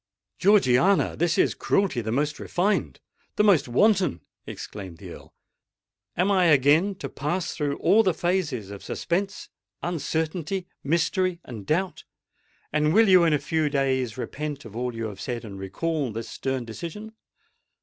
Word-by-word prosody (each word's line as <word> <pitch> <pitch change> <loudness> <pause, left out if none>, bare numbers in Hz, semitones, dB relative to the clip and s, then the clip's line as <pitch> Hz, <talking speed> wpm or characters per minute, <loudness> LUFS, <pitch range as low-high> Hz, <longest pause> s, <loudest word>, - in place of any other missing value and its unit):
"Georgiana, 190 -2 +4
this 170 0 +1
is - - +3
cruelty 195 -11 0
the 110 0 -3
most 145 +5 -1
refined—the 205 +2 -2
most 185 -10 +4
wanton!" 185 - +2 0.3
exclaimed 95 -5 -8
the - - -10
Earl. - - -12 0.9
"Am 185 +4 +2
I 185 -2 +4
again 155 +6 +4
to 140 - -6
pass 150 +7 -3
through 145 -2 -2
all 220 - +4
the 185 -6 +1
phases 160 - -1
of 100 - -9
suspense—uncertainty—mystery—and 170 - -3
doubt?—and 155 -3 -3
will 225 0 +6
you 185 -3 +6
in 160 - +3
a - - +4
few 155 +1 0
days 130 -5 0
repent 145 +2 -5
of 110 -2 -11
all 125 0 -3
you 115 0 -3
have 100 -3 -7
said, 120 -2 -4
and 100 -2 -8
recall 140 - -2
this 115 +1 -6
stern 130 -2 -3
decision? 170 - -7
150 Hz, 140 wpm, -25 LUFS, 125-185 Hz, 0.9 s, will